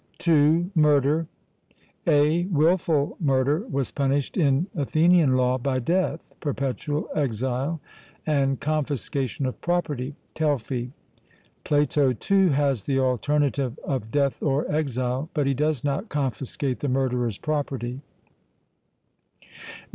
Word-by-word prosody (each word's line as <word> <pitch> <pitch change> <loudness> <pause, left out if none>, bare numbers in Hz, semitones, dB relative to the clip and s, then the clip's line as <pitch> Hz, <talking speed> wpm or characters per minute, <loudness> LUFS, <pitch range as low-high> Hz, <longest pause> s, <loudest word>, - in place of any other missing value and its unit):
(2) 165 +2 +3
Murder. 150 0 +3 0.8
(a) 155 +2 +3
Wilful 165 -3 +2
murder 145 - +1
was 135 -2 -2
punished 140 0 0
in 145 -1 +2
Athenian 155 -1 +3
law 130 0 +2
by 130 +1 -1
death, 175 +9 -1
perpetual 145 +1 -2
exile, 130 +3 -1 0.5
and 135 -3 +1
confiscation 140 -2 -2
of 130 - -4
property 145 -6 -1 0.2
(Telfy). 130 -5 -1 0.7
Plato, 145 -2 +2
too, 195 - +2
has 140 -6 +1
the 135 - 0
alternative 135 +1 0
of 130 -6 -3
death 140 +1 0
or 140 0 +1
exile, 130 -1 -1
but 145 -3 +1
he 135 - +2
does 150 -1 0
not 145 +9 -2
confiscate 135 -1 -2
the 145 - -2
murderer's 125 -4 0
property. 135 -4 -3
140 Hz, 110 wpm, -25 LUFS, 130-155 Hz, 0.8 s, 2